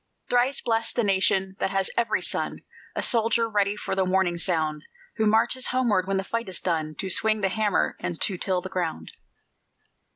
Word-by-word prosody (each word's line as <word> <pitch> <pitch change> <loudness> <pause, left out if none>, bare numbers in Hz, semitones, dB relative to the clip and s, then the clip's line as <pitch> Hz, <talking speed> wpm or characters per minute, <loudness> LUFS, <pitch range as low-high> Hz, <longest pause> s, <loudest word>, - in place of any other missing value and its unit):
Thrice 245 +3 +2
blest 225 -1 -1
the 240 - +2
nation 190 -1 +1
that - - 0
has 195 -1 -1
every 230 -2 +1
son - - -1 0.3
A - - -1
soldier, 230 0 +3
ready 205 -2 +1
for - - -4
the 190 0 +2
warning 185 -2 +1
sound; 160 -4 0 0.4
Who 220 -1 +2
marches 225 +4 +2
homeward 230 -8 +1
when 195 0 0
the 190 - -1
fight 230 0 -3
is 185 - -3
done, 155 -3 -2
To 190 - -4
swing 215 +3 +2
the 195 - +2
hammer 210 0 +1
and 170 -2 -4
to 195 - +1
till 185 -2 0
the 190 - -6
ground. 170 - -3
195 Hz, 190 wpm, -25 LUFS, 185-225 Hz, 0.4 s, soldier